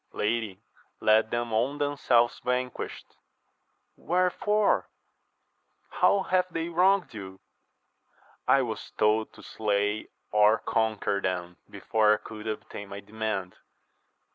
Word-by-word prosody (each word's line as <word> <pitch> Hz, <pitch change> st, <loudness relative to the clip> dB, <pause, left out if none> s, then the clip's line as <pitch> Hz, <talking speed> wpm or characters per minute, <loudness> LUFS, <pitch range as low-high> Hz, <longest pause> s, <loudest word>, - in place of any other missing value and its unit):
Lady, 110 Hz, -3 st, -1 dB, 0.4 s
let 110 Hz, +1 st, +4 dB
them 120 Hz, -1 st, -2 dB
own 130 Hz, +6 st, +1 dB
themselves 135 Hz, -5 st, +2 dB
vanquished.— 125 Hz, 0 st, -3 dB, 0.8 s
rWherefore? 185 Hz, +4 st, +1 dB, 1.1 s
how 200 Hz, -1 st, +3 dB
have 185 Hz, -1 st, +1 dB
they 165 Hz, 0 st, -3 dB
wronged 185 Hz, +1 st, +3 dB
you? 95 Hz, -3 st, -9 dB, 0.5 s
— -, -, -43 dB, 0.3 s
I -, -, +5 dB
was -, -, -5 dB
told 110 Hz, +1 st, +2 dB
to -, -, -15 dB
slay 105 Hz, 0 st, -1 dB, 0.2 s
or 105 Hz, +1 st, +5 dB
con 110 Hz, -1 st, 0 dB
quer 100 Hz, 0 st, -1 dB
them 90 Hz, -2 st, -3 dB
before 105 Hz, -1 st, +2 dB
I -, -, -4 dB
could 110 Hz, +1 st, -9 dB
obtain 105 Hz, -2 st, -6 dB
my 100 Hz, +1 st, -7 dB
demand. 105 Hz, -3 st, -4 dB
110 Hz, 115 wpm, -28 LUFS, 105-140 Hz, 1.1 s, I